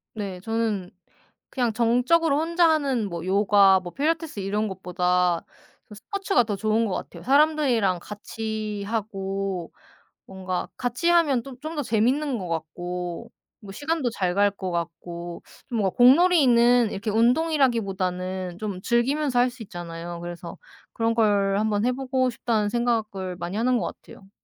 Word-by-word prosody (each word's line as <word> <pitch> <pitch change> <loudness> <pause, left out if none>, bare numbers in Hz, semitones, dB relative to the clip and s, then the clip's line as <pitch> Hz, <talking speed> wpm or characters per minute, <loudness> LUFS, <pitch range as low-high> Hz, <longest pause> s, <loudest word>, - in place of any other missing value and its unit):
네. 200 -4 -5
저는 220 -3 -2 0.6
그냥 245 -4 -1
정적으로 250 +7 +2
혼자 335 +1 +3
하는 275 -9 +1
뭐 170 0 -5
요가, 195 0 +5
뭐 175 -1 -9
필라테스 310 -3 -1
이런 205 +2 -1
것보다 180 -2 0 0.5
저 210 - -11
스포츠가 390 - 0
더 210 -2 -3
좋은 215 +3 +1
것 190 - -2
같아요. 170 - -7
사람들이랑 270 - +3
같이 215 0 -5
하고. 195 -4 -3 0.6
뭔가 185 -1 -4
같이 250 +7 -1
하면 310 -8 +3
좀 255 -2 -11
좀 315 +3 -6
더 295 - -1
재밌는 250 +5 +1
것 185 -3 -5
같고, 175 +2 -5 0.3
뭐 200 -2 -10
시간도 290 -2 -1
잘 180 -4 -1
갈 205 0 +4
것 190 -2 -5
같고, 170 0 -5 0.3
좀 235 - -1
뭔가 195 -3 0
공놀이는 245 - +5
이렇게 205 +3 -4
운동이라기보다는 200 - 0
좀 205 -4 -4
즐기면서 255 +3 +1
할 250 +1 +4
수 245 -1 -10
있잖아요. 175 -3 -7
그래서 175 -1 -7 0.4
그런 230 0 0
걸 200 -3 +2
한번 215 -1 0
해보고 255 0 0
싶다는 225 -3 -1
생각을 215 -6 -1
많이 175 +4 -4
하는 245 +1 +2
것 - - -2 0.2
같아요. 195 - -15
215 Hz, 305 characters per minute, -25 LUFS, 190-250 Hz, 0.6 s, 요가